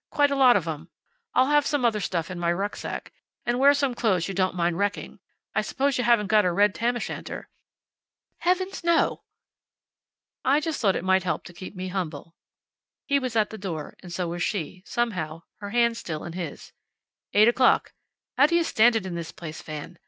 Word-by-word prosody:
Quite 290 Hz, -1 st, +2 dB
a -, -, +1 dB
lot 255 Hz, -3 st, +6 dB
of 170 Hz, -4 st, -3 dB
'em. 160 Hz, +1 st, -5 dB, 0.5 s
I'll 260 Hz, +2 st, +4 dB
have 295 Hz, -1 st, +4 dB
some 285 Hz, -4 st, +1 dB
other 220 Hz, -3 st, +2 dB
stuff 175 Hz, -3 st, -2 dB
in 180 Hz, -, -5 dB
my 170 Hz, 0 st, +1 dB
rucksack. 200 Hz, +4 st, -4 dB, 0.3 s
And 240 Hz, +1 st, 0 dB
wear 280 Hz, +1 st, +7 dB
some 280 Hz, -3 st, 0 dB
clothes 190 Hz, -8 st, +1 dB
you 195 Hz, -, -4 dB
don't 185 Hz, -1 st, 0 dB
mind 170 Hz, 0 st, 0 dB
wrecking. 205 Hz, 0 st, -2 dB, 0.3 s
I -, -, +2 dB
suppose 275 Hz, -1 st, 0 dB
you -, -, +1 dB
haven't 235 Hz, -3 st, +4 dB
got 210 Hz, +1 st, +4 dB
a 180 Hz, -, +2 dB
red 205 Hz, +3 st, +3 dB
tam 240 Hz, +2 st, 0 dB
o' -, -, -2 dB
shanter?" -, -, -6 dB, 0.9 s
"Heavens, 370 Hz, +1 st, 0 dB
no!" 340 Hz, -1 st, +2 dB, 1.2 s
"I 280 Hz, +3 st, +4 dB
just 315 Hz, -1 st, -3 dB
thought 195 Hz, -5 st, +3 dB
it -, -, -2 dB
might 190 Hz, 0 st, +3 dB
help 180 Hz, -1 st, -2 dB
to 175 Hz, -, -12 dB
keep 185 Hz, +3 st, -9 dB
me 185 Hz, 0 st, -5 dB
humble." 165 Hz, -3 st, -5 dB, 0.7 s
He 280 Hz, 0 st, +2 dB
was 255 Hz, -3 st, -4 dB
at 215 Hz, -2 st, +2 dB
the 220 Hz, -, -8 dB
door, 165 Hz, -6 st, -5 dB
and 180 Hz, -, -10 dB
so 175 Hz, 0 st, -2 dB
was 175 Hz, +1 st, -4 dB
she, 180 Hz, -1 st, -2 dB
somehow, 170 Hz, -9 st, -2 dB, 0.2 s
her 205 Hz, -1 st, -6 dB
hand 235 Hz, +1 st, +2 dB
still 155 Hz, -8 st, -5 dB
in 170 Hz, -, -7 dB
his. 170 Hz, -5 st, -7 dB, 0.6 s
"Eight 210 Hz, +2 st, +6 dB
o'clock. 250 Hz, +2 st, +3 dB, 0.4 s
How 280 Hz, +3 st, +7 dB
do 340 Hz, -, +1 dB
you 340 Hz, -, +4 dB
stand 235 Hz, -5 st, +4 dB
it 220 Hz, -4 st, -1 dB
in 185 Hz, -, -4 dB
this 170 Hz, -2 st, -5 dB
place, 155 Hz, -2 st, -8 dB
Fan? 155 Hz, +2 st, -8 dB
205 Hz, 205 wpm, -26 LUFS, 175-245 Hz, 1.2 s, wear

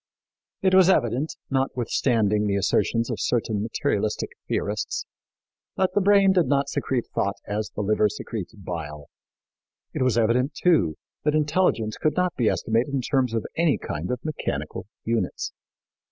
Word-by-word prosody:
It 190 Hz, -1 st, +3 dB
was 190 Hz, -1 st, +7 dB
evident, 135 Hz, -, +1 dB, 0.2 s
notwithstanding 115 Hz, -5 st, +1 dB
the 100 Hz, -, +1 dB
assertions 115 Hz, +3 st, +1 dB
of -, -, -3 dB
certain 110 Hz, -3 st, 0 dB
materialistic 110 Hz, -1 st, -1 dB, 0.2 s
theorists, 105 Hz, +1 st, -2 dB, 0.7 s
that 190 Hz, -1 st, +1 dB
the 205 Hz, -, +3 dB
brain 200 Hz, 0 st, +5 dB
did 180 Hz, -5 st, +3 dB
not 140 Hz, +1 st, +1 dB
secrete 130 Hz, -4 st, -1 dB
thought 100 Hz, 0 st, 0 dB
as 105 Hz, +1 st, -3 dB
the -, -, -2 dB
liver 105 Hz, +1 st, +3 dB
secretes 105 Hz, -1 st, -6 dB
bile; 80 Hz, -7 st, -7 dB, 0.8 s
it -, -, -3 dB
was 130 Hz, -3 st, +2 dB
evident, 125 Hz, +5 st, +2 dB
too, 95 Hz, -, +3 dB, 0.3 s
that 150 Hz, 0 st, +2 dB
intelligence 150 Hz, -8 st, +1 dB
could 155 Hz, -, 0 dB
not 180 Hz, -1 st, +1 dB
be 115 Hz, -4 st, +2 dB
estimated 120 Hz, +5 st, 0 dB
in 135 Hz, -, +1 dB
terms 125 Hz, -3 st, 0 dB
of 110 Hz, -, -1 dB
any 165 Hz, -4 st, +3 dB
kind 75 Hz, +2 st, -5 dB
of 125 Hz, +1 st, -3 dB
mechanical 85 Hz, -, -4 dB, 0.2 s
units. 115 Hz, -5 st, -1 dB
120 Hz, 150 wpm, -25 LUFS, 105-150 Hz, 0.8 s, was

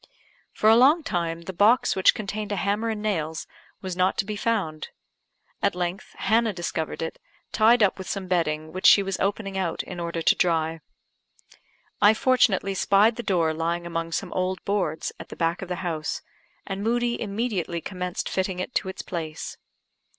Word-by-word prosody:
For 215 Hz, -, 0 dB
a 220 Hz, -, +8 dB
long 285 Hz, +7 st, +5 dB
time 170 Hz, -, -2 dB
the 190 Hz, -, -6 dB
box 215 Hz, +7 st, +4 dB
which 190 Hz, -, +5 dB
contained 210 Hz, 0 st, -4 dB
a -, -, 0 dB
hammer 205 Hz, +4 st, 0 dB
and 215 Hz, -1 st, -3 dB
nails 160 Hz, -7 st, -2 dB, 0.4 s
was 185 Hz, -2 st, -4 dB
not 185 Hz, +1 st, +1 dB
to -, -, +1 dB
be 210 Hz, +1 st, -4 dB
found. 200 Hz, -9 st, -2 dB, 0.7 s
At 200 Hz, -2 st, +1 dB
length 180 Hz, +1 st, -4 dB
Hannah 220 Hz, +2 st, +2 dB
discovered 165 Hz, -2 st, -3 dB
it, 165 Hz, -, -5 dB, 0.3 s
tied 225 Hz, +1 st, +5 dB
up 200 Hz, -, +2 dB
with 190 Hz, -, -6 dB
some 195 Hz, -2 st, -3 dB
bedding 155 Hz, -3 st, -1 dB
which 185 Hz, -, +3 dB
she 200 Hz, -, +7 dB
was 195 Hz, -1 st, -3 dB
opening 195 Hz, -1 st, -1 dB
out 170 Hz, -3 st, -2 dB
in 180 Hz, -, -8 dB
order 170 Hz, -1 st, -3 dB
to -, -, +5 dB
dry. 165 Hz, -2 st, 0 dB, 1.2 s
I 210 Hz, +1 st, +7 dB
fortunately 215 Hz, -6 st, +2 dB
spied 200 Hz, +4 st, +4 dB
the 240 Hz, -, -4 dB
door 170 Hz, -7 st, +1 dB
lying 170 Hz, +2 st, -2 dB
among 165 Hz, -1 st, -3 dB
some -, -, -3 dB
old 185 Hz, -1 st, -2 dB
boards 185 Hz, -6 st, -1 dB
at -, -, -9 dB
the -, -, -8 dB
back 165 Hz, 0 st, 0 dB
of 190 Hz, -, -5 dB
the 180 Hz, -, -1 dB
house, 160 Hz, -3 st, -3 dB, 0.4 s
and 195 Hz, 0 st, -4 dB
Moodie 240 Hz, +1 st, 0 dB
immediately 200 Hz, -5 st, -2 dB
commenced 180 Hz, 0 st, -4 dB
fitting 190 Hz, -1 st, -1 dB
it 185 Hz, -, -4 dB
to 190 Hz, -, -1 dB
its 190 Hz, -, -6 dB
place. 160 Hz, -3 st, -5 dB
190 Hz, 180 wpm, -25 LUFS, 170-210 Hz, 1.2 s, a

